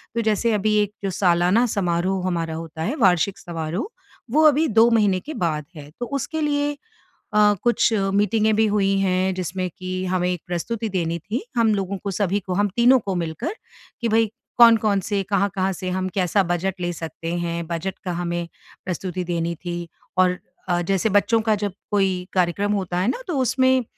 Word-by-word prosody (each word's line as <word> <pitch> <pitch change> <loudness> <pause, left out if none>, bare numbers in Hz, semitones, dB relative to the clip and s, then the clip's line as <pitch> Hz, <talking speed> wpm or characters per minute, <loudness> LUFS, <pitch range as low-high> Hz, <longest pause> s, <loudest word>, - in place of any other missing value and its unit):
तो 230 - +1
जैसे 220 +1 +1
अभी 210 +1 +1
एक 205 -1 -5
सालाना 180 +5 +3
समारोह 185 0 0
हमारा 165 -3 -2
होता 160 -1 -7
है, 220 - -1
वार्षिक 190 - +2
समारोह, 170 - -4 0.4
वो 310 +3 +4
अभी 305 +2 +3
2 225 +1 +5
महीने 205 -5 +3
के 300 - -8
बाद 155 - -1
है। 145 -2 -10
तो 245 - -2
उसके 280 +4 -3
लिए 290 -1 0 0.6
अ, 210 0 +5
कुछ 240 -1 +3 0.2
मीटिंगे 210 +2 +2
भी 220 +1 +3
हुई 195 -1 +2
हैं, 185 0 +1
जिसमें 185 0 -3
कि 185 0 -4
हमें 180 -1 0
एक 180 - -4
प्रस्तुति 215 +6 -3
देनी 170 -3 -1
थी। 215 - -4
हम 225 -2 +4
लोगों 195 0 -2
को, 200 +1 -4
सभी 200 +1 0
को, 185 -1 -5
हम 205 +2 +2
तीनों 245 +2 +6
को 195 -3 -3
मिलकर 175 - -3 0.5
कि 235 - +1
भई 225 +1 +4 0.3
कौन-कौन 225 -4 +6
से 205 -2 0
कहाँ-कहाँ 195 -1 +1
से 185 0 -5
हम 185 +1 -1
कैसा 190 +1 +2
बजट 185 +2 -1
ले 175 - -1
सकते 165 +1 -5
हैं, 170 0 -3
बजट 175 +3 -3
का 180 - -3
हमें 175 -1 -2 0.4
प्रस्तुति 180 0 -3
देनी 170 -1 -2
थी। 175 -1 -4 0.3
और 180 0 +3 0.3
अ, 175 0 +2
जैसे 195 +4 +1
बच्चों 210 +3 +3
का 220 -1 +2
जब 200 - -3 0.2
कोई 190 -3 +1
कार्यक्रम 185 +3 +1
होता 185 -3 -2
है 185 - +1
ना, 255 - -1
तो 335 -6 -1
उसमें 260 0 +3
195 Hz, 185 wpm, -22 LUFS, 175-220 Hz, 0.6 s, तीनों